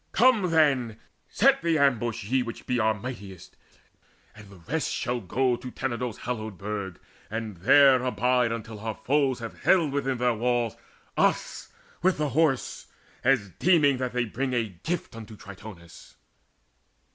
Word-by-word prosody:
Come 225 -4 +4
then, 135 -9 +2 0.3
set 275 +4 +3
the 165 -1 +1
ambush, 120 -5 +1
ye 130 +6 +1
Which 115 -1 -7
be 125 -1 0
our 110 -1 +2
mightiest, 100 -5 -9 0.8
and 105 -2 -14
the 100 - -14
rest 135 - -3
shall 125 0 -2
go 125 +6 +1
To 125 - -8
Tenedos' 125 -3 -4
hallowed 110 -5 -4
burg, 100 -2 -5 0.3
and 110 -3 -5
there 130 +8 +6
abide 125 -1 +1
Until 115 -2 -6
our 110 0 -4
foes 135 +3 +1
have 115 - -7
haled 170 -6 +3
within 135 -2 -1
their 125 0 +2
walls 120 0 0 0.4
Us - - 0 0.3
with 185 +1 +2
the 150 -1 -1
Horse, 145 -2 0 0.4
as 120 -6 +2
deeming 150 -7 +4
that 125 -1 -2
they 125 -1 0
bring 130 +4 -3
A 115 -3 0
gift 170 -7 -4
unto 110 -1 -10
Tritonis. 100 -4 -12
125 Hz, 150 wpm, -26 LUFS, 110-135 Hz, 0.8 s, there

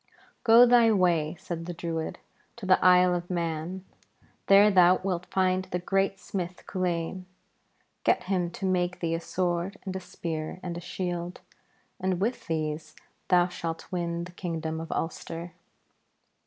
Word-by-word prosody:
'Go 235 0 +8
thy 240 -2 +6
way,' 175 -5 +2
said 170 -3 -6
the 175 - -5
Druid, 165 -1 -3 0.4
'to 235 - -8
the 185 0 +4
Isle 180 0 +6
of 175 0 -3
Mann. 170 +1 -3 0.6
There 200 +2 +7
thou 185 -1 +6
wilt 185 -2 -2
find 185 0 +1
the 180 -1 -3
great 195 +2 0
smith 180 -2 -5
Culain. 180 0 -2 0.8
Get - - +2
him 180 -2 0
to 185 - -6
make 180 -1 0
thee 165 -1 -1
a 165 - 0
sword 180 +2 -2
and 190 -1 -4
a - - -2
spear 165 -2 -5
and 175 -1 -4
a 170 - -6
shield, 175 0 -4 0.6
and 185 -1 0
with 225 +6 -2
these 155 -1 -3 0.3
thou 180 -1 +4
shalt 165 -2 -6
win 170 -1 -2
the 175 - -9
kingdom 160 -3 -4
of 165 - -7
Ulster.' 165 +1 -4
180 Hz, 155 wpm, -28 LUFS, 170-185 Hz, 0.8 s, Go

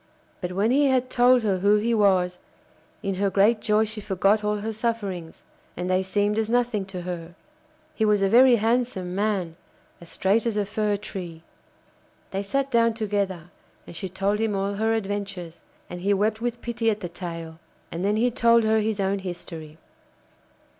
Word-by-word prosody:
But 180 -1 -4
when 205 +5 +1
he 285 +2 +4
had 255 -1 +1
told 245 0 +4
her 195 -3 +1
who 200 +3 +4
he 225 +3 +1
was, 185 -4 +2 0.6
in 195 - -1
her 200 - +3
great 205 +4 +3
joy 215 0 +2
she 215 0 -5
forgot 200 +2 +1
all 210 0 0
her 220 +1 -3
sufferings, 205 -7 -4 0.3
and 180 +1 -2
they 185 0 +3
seemed 205 +3 0
as 220 0 -1
nothing 235 -4 +1
to 185 -2 -7
her. 175 -1 -6 0.6
He 220 - -1
was 210 -2 +3
a - - +4
very 245 +4 +6
handsome 225 -5 0
man, 190 -5 -1 0.4
as 170 - -12
straight 210 +5 +1
as 220 -2 -1
a 205 - +1
fir 210 0 -1
tree. 175 -5 -7 0.9
They 195 - -2
sat 275 +7 -2
down 230 -2 +3
together 200 -6 -2 0.3
and - - -11
she 190 +2 -4
told 195 +3 -1
him 220 -2 0
all 195 +1 -1
her 220 +2 0
adventures, 195 -5 -4 0.3
and 175 0 -8
he 200 +2 +2
wept 215 +2 0
with 240 0 -3
pity 235 -1 0
at 215 -1 -1
the 180 - -3
tale. 165 -2 -7 0.3
And 170 +2 -4
then 205 +1 +1
he 240 +3 +2
told 235 0 +4
her 220 0 +3
his 215 -1 -1
own 195 0 0
history. 165 -4 -8
205 Hz, 185 wpm, -25 LUFS, 185-225 Hz, 0.9 s, very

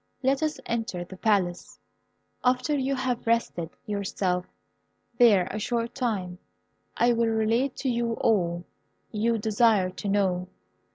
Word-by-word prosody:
Let 270 +2 +2
us 310 -2 -1
enter 225 -6 -2
the 185 +2 -11
Palace. 185 -4 0 0.7
After 255 +4 +2
you 275 0 0
have 250 -3 -2
rested 230 -8 0 0.2
yourself 190 -3 -1 0.7
there 210 -7 +6
a 215 - -3
short 235 +2 -2
time 195 -9 -2 0.6
I 240 0 +4
will 230 0 +2
relate 225 +4 +1
to - - +3
you 235 -1 0
all 175 -7 +1 0.5
you 230 +2 +1
desire 215 -3 +3
to 190 +2 -5
know. 185 -3 +1
220 Hz, 130 wpm, -27 LUFS, 185-240 Hz, 0.7 s, there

